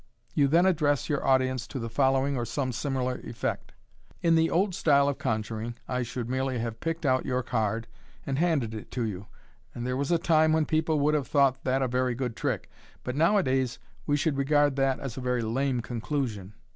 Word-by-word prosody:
You 145 -2 +3
then 170 +6 +4
address 150 -7 +2
your 145 -2 0
audience 130 -1 +2
to - - -6
the 115 -2 -3
following 135 +3 +2
or 120 - -1
some 130 +2 -2
similar 130 0 -2
effect: 115 - -4 0.2
— 115 0 -34
'* - - -29
In 165 -1 +4
the 165 0 +4
old 190 +2 +1
style 140 -5 +3
of 140 - -1
conjuring, 110 +1 -2
I 125 0 -1
should 120 0 -4
merely 130 0 -1
have 115 -1 -4
picked 165 0 -3
out 130 -1 +2
your 125 -1 -1
card, 110 -1 -1 0.4
and 135 0 -1
handed 155 -10 +1
it 110 - -7
to 125 - -1
you 105 -5 -3
j 100 - -12 0.5
and 120 - -4
there 125 0 -1
was 140 +1 -1
a 170 - +4
time 160 -1 +3
when 160 -1 +2
people 155 0 +1
would 150 +2 +3
have 145 -3 0
thought 140 -3 +2
that 135 +1 +1
a - - +1
very 125 0 0
good 125 -2 -3
trick, - - -2 0.4
but 125 - -3
nowadays 140 - +2 0.3
we 145 - +2
should 150 -1 0
regard 145 0 +3
that 135 -1 +1
as 135 -4 -6
a - - -4
tery 125 -1 0
lame 125 +2 0
conclusion. 115 -5 -3
130 Hz, 215 wpm, -28 LUFS, 120-145 Hz, 0.5 s, then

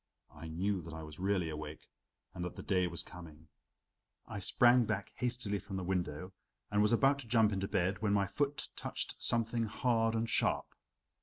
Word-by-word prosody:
I 80 +2 -9
knew 95 +4 -1
that 80 - -8
I 80 - -6
was 75 +1 -10
really 95 -2 +1
awake 75 0 -7 0.5
and 90 - -4
that 90 - -4
the - - -7
day 90 -2 +2
was 85 -1 -2
coming. 80 -3 -12 0.8
I 105 - -5
sprang 120 +5 +5
back - - -2
hastily 120 -5 -1
from 95 0 -7
the 95 - -2
window 90 0 -2 0.4
and 105 0 +3
was 105 - +4
about 135 +4 +4
to 130 - -8
jump 110 -2 +4
into 95 0 -1
bed, 95 +2 0
when 105 -2 +1
my 100 -1 +3
foot 140 +7 -1
touched - - -3
something 115 0 +1
hard 115 0 +1
and 115 +1 0
sharp. - - +1
100 Hz, 185 wpm, -34 LUFS, 90-115 Hz, 0.8 s, sprang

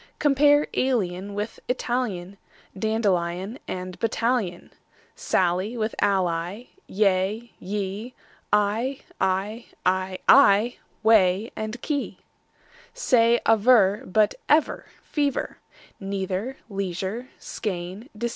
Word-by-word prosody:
Compare 290 0 +4
alien 200 -6 -1
with 210 +2 -4
Italian, 220 -7 -2 0.4
Dandelion 195 0 -1
with 185 0 -6
battalion, 230 -5 -1 0.4
Sally 185 +6 0
with 220 0 -1
ally; 185 +1 0 0.2
yea, 200 +3 0
ye, 205 +4 -4 0.4
Eye, 215 +6 +1 0.2
I, 195 +5 -1 0.2
ay, 185 0 +1
aye, 235 -3 +6 0.3
whey, 210 -1 +4
key, 215 +2 -4
quay! 290 -3 -2 0.8
Say 235 - +3
aver, 220 -2 +5
but 210 +2 +3 0.2
ever, 305 +1 +2 0.2
fever, 290 -3 -2 0.4
Neither, 195 +5 -3
leisure, 195 +3 -4
skein, 190 +4 -5
receiver. 235 +3 -2
210 Hz, 90 wpm, -25 LUFS, 190-235 Hz, 0.8 s, aye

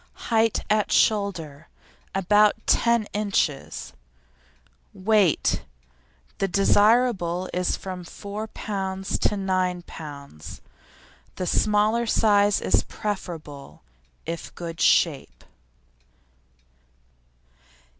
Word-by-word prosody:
HEIGHT 225 -1 +2
AT 210 0 +1
SHOULDER 170 -8 0 0.5
About 205 +2 +4
ten 235 -2 +2
inches. 195 - -2 1.0
WEIGHT 200 -3 +2 0.8
The 195 - +1
size - - -11
desirable 200 -2 +3
is 180 0 0
from 185 -2 -7
4 205 +5 -7
lb. 190 -3 -4
to 210 - +1
9 185 -2 -1
lb. 140 - -10 0.8
The 185 - -3
smaller 215 +5 +2
size 205 -2 +3
is 95 +3 +2
preferable 155 - -7 0.4
if 165 +1 -6
good 170 -1 -6
shape. 150 -6 +2
195 Hz, 85 wpm, -24 LUFS, 170-210 Hz, 1.0 s, About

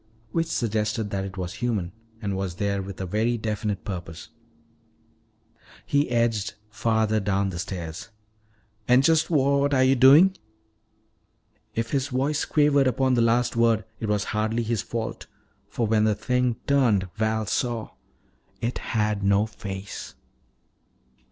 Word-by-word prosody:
Which 165 0 0
suggested 110 -5 -1
that 95 -1 -2
it 95 0 -8
was 90 -1 -4
human 105 -8 -1 0.3
and 100 -2 -1
was 95 -2 -3
there 100 +1 -1
with 95 0 -8
a 95 - -3
very 110 +6 0
definite 105 -2 -3
purpose. 85 -5 -7 1.6
He 145 -1 +1
edged 115 -4 0 0.2
farther 110 -1 +1
down 100 -1 0
the 85 - -6
stairs. 90 +1 -6 0.8
"And 125 +2 +5
just 160 +1 +3
what 140 -2 +2
are 130 - +4
you 130 +1 +4
doing?" 145 +9 +7 1.4
If 115 0 -2
his 140 -1 0
voice 140 +3 0
quavered 145 -2 +3
upon 130 +1 +1
the 120 - +3
last 120 +1 +2
word, 115 -2 +2
it 110 - -3
was 105 -1 +1
hardly 110 +2 0
his 115 -2 -1
fault. 115 -1 -5 0.4
For 115 - -1
when 110 0 +2
the 110 -1 +2
thing 125 0 0
turned, 120 -9 +2
Val 110 0 0
saw 115 +1 -2 0.7
It 120 +2 -2 0.2
had 105 -1 +1
no 100 +1 +3
face! 100 -6 -7
110 Hz, 140 wpm, -25 LUFS, 100-125 Hz, 1.6 s, doing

